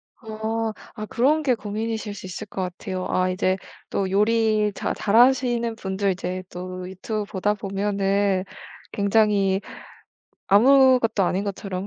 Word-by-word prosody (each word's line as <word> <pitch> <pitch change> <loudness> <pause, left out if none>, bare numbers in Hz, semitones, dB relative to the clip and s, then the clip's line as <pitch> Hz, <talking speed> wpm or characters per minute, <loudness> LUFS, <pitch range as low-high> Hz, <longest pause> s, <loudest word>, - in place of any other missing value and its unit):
아. 220 0 -3 0.2
아 215 -1 -5
그런 290 +8 +2
게 260 -3 +3
고민이실 215 0 -4
수 190 - -9
있을 195 +3 -7
것 190 - -5
같아요. 185 +1 -4
아 185 0 +1
이제 185 +1 0 0.3
또 195 -1 -1
요리 215 +1 +2
자 - - -2
잘하시는 240 +1 +3
분들 195 -1 -1
이제 185 0 -4
또 185 0 -6
유튜브 210 +3 -4
보다 205 +1 -1
보면은 200 -1 0 0.5
굉장히 200 -2 +2 0.9
아무것도 250 -1 +5
아닌 190 +3 0
것처럼 195 -1 -4
205 Hz, 265 characters per minute, -23 LUFS, 190-225 Hz, 0.9 s, 아무것도